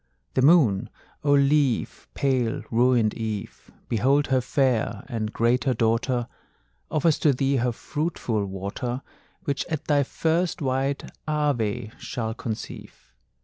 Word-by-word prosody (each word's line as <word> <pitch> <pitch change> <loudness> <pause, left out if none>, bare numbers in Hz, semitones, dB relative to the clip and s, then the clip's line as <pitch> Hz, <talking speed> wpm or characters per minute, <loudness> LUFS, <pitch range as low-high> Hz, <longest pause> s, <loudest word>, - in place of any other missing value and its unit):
The 130 - +2
moon, 130 - +5 0.3
O 145 - +2
leave, 140 -3 +2
pale 130 -4 0
ruined 120 -2 +3
Eve; 110 -3 -5 0.2
Behold 135 +6 +2
her 130 -1 +3
fair 120 -5 0
and 110 -4 -3
greater 125 +3 +2
daughter[C] 115 +2 +1 0.6
Offers 155 0 +2
to 150 - +4
thee 135 +1 +1
her 125 0 +1
fruitful 120 -6 -2
water, 100 +7 -4 0.4
Which 140 -6 -1
at 155 -3 -3
thy 145 -2 +3
first 165 +6 0
white 135 0 0 0.2
Ave 135 -9 0
shall 110 -3 -3
conceive! 110 -1 -7
130 Hz, 120 wpm, -25 LUFS, 115-140 Hz, 0.6 s, moon